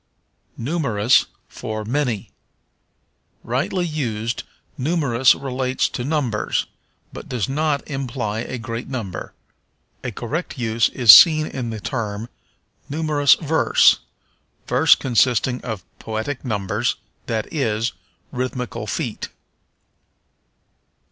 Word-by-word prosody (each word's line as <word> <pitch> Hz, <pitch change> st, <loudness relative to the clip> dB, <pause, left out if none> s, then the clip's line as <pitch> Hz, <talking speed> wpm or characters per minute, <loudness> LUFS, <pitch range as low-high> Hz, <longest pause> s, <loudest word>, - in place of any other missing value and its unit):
Numerous 120 Hz, -5 st, +2 dB, 0.2 s
for 110 Hz, -1 st, -6 dB
Many. 125 Hz, -3 st, -2 dB, 1.1 s
Rightly 175 Hz, -, -1 dB
used, 115 Hz, -8 st, -2 dB, 0.3 s
numerous 135 Hz, -4 st, +3 dB
relates 130 Hz, -1 st, -1 dB
to 120 Hz, -, -4 dB
numbers, 135 Hz, -6 st, -1 dB, 0.5 s
but -, -, -9 dB
does 120 Hz, -6 st, -1 dB
not 145 Hz, +1 st, -1 dB
imply 130 Hz, -6 st, -3 dB
a 125 Hz, +2 st, -4 dB
great 115 Hz, 0 st, -5 dB
number. 115 Hz, -9 st, -5 dB, 0.7 s
A -, -, -2 dB
correct 140 Hz, -, -4 dB
use 115 Hz, -2 st, +1 dB
is 120 Hz, -5 st, +8 dB
seen 155 Hz, -, +8 dB
in 125 Hz, -5 st, -4 dB
the 110 Hz, -1 st, -5 dB
term 110 Hz, -1 st, -4 dB, 0.6 s
numerous 150 Hz, -1 st, +3 dB
verse 160 Hz, 0 st, +4 dB, 0.7 s
verse -, -, +5 dB
consisting 125 Hz, 0 st, +1 dB
of 110 Hz, -6 st, -5 dB, 0.2 s
poetic 110 Hz, +5 st, -4 dB
numbers; 105 Hz, -7 st, -1 dB, 0.3 s
that 110 Hz, -2 st, -3 dB
is, 115 Hz, -5 st, 0 dB, 0.4 s
rhythmical 125 Hz, -1 st, -4 dB
feet. -, -, -3 dB
125 Hz, 100 wpm, -21 LUFS, 110-145 Hz, 1.1 s, is